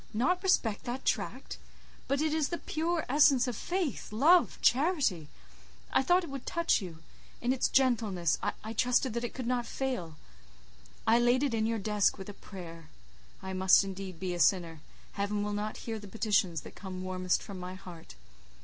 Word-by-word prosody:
"Not 360 +11 +1
respect 245 - +1
that 250 +2 -4
tract? - - -2 0.5
But 275 +1 0
it 310 -1 +1
is 310 -3 +1
the 345 - -2
pure 330 +1 -2
essence 275 -2 +5
of 245 - -2
faith, 350 - -3
love, 315 +11 +4
charity! 260 - +2 0.6
I - - +4
thought 355 +6 +3
it 335 - -7
would 275 -2 -7
touch 335 -8 +1
you: 165 -4 -9 0.4
in 245 +2 +1
its 265 - +1
gentleness, 220 - +2
I 220 +1 -4
trusted 250 +1 +2
that 235 +1 -2
it 240 - -5
could 255 - -4
not 240 -1 -1
fail. 245 - -3 0.9
I 225 +2 +5
laid 245 +3 +3
it 275 -5 0
in 220 -1 +1
your 225 0 0
desk 210 -1 +1
with 190 0 -8
a - - -7
prayer: 165 -5 -11 0.5
I 190 0 -5
must 185 +1 +5
indeed 190 -3 -7
be 185 -1 -2
a 175 - -4
sinner: 170 -4 +2 0.3
Heaven 205 +1 -2
will 210 0 -2
not 210 +1 -3
hear 225 -2 -3
the 205 - -10
petitions 205 -6 0
that - - -11
come 185 -2 -7
warmest 185 -1 -1
from 195 -3 -8
my 180 +1 -6
heart. 175 - -12
220 Hz, 185 wpm, -30 LUFS, 185-265 Hz, 0.9 s, essence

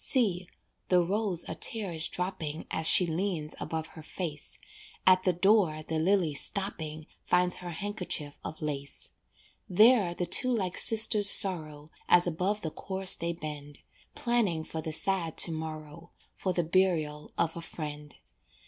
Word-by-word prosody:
See, 190 -9 +1 0.4
the 180 - +3
rose 195 -1 -1
a - - -4
tear 215 -5 0
is 160 -1 0
dropping 165 -4 -4
As 160 - +1
she 180 - +7
leans 165 -2 -3
above 160 -1 -4
her 160 - -12
face, 155 -1 -5 0.5
At 185 0 +5
the 185 - +2
door 180 -3 +2
the 160 0 -3
lily 175 -2 +1
stopping, 160 -3 -3 0.2
Finds 180 0 +1
her 180 - -8
handkerchief 175 -5 -4
of 155 - -7
lace. 140 -2 -5 0.6
There 210 -2 +4
the 175 - -2
two 255 - +2
like 190 -7 -1
sisters 215 -2 +6
sorrow, 155 -7 0 0.2
As 175 0 +5
above 185 +5 -2
the 160 - -4
corse 190 +1 +1
they 170 +1 -3
bend, 150 -3 -9 0.3
Planning 220 -10 0
for 160 0 -6
the 160 - -5
sad 170 0 -1
to 170 - +7
morrow 160 +1 -8 0.2
For 185 - -3
the 175 -1 -1
burial 160 -4 0
of 165 -1 0
a 170 - -6
friend. 150 -3 -7
175 Hz, 155 wpm, -29 LUFS, 155-190 Hz, 0.6 s, she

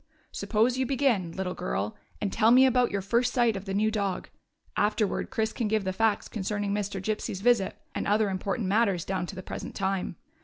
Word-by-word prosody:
Suppose 235 +4 +1
you 260 - +1
begin, 245 -10 +1
little 185 0 -3
girl, 105 - -3 0.2
and 200 - -2
tell 220 0 +4
me 255 +2 +7
about 250 -2 +3
your 200 -1 -2
first 235 +5 +2
sight 240 -4 +2
of 195 0 -6
the 195 - -3
new 215 +2 +2
dog; 200 -4 -2 0.5
afterward 210 0 0
Chris 220 0 -1
can 230 - -1
give 215 -1 +1
the 190 0 -2
facts 220 +1 +1
concerning 205 -1 -2
Mr. 205 -1 -2
Gypsy's 195 -1 -3
visit 230 -4 +2 0.2
and - - -2
other 210 0 +2
important 195 +3 -2
matters 200 -4 +2
down 185 -2 -2
to 195 - -7
the 185 - -7
present - - -6
time. 190 -2 -1
205 Hz, 200 wpm, -28 LUFS, 190-225 Hz, 0.5 s, me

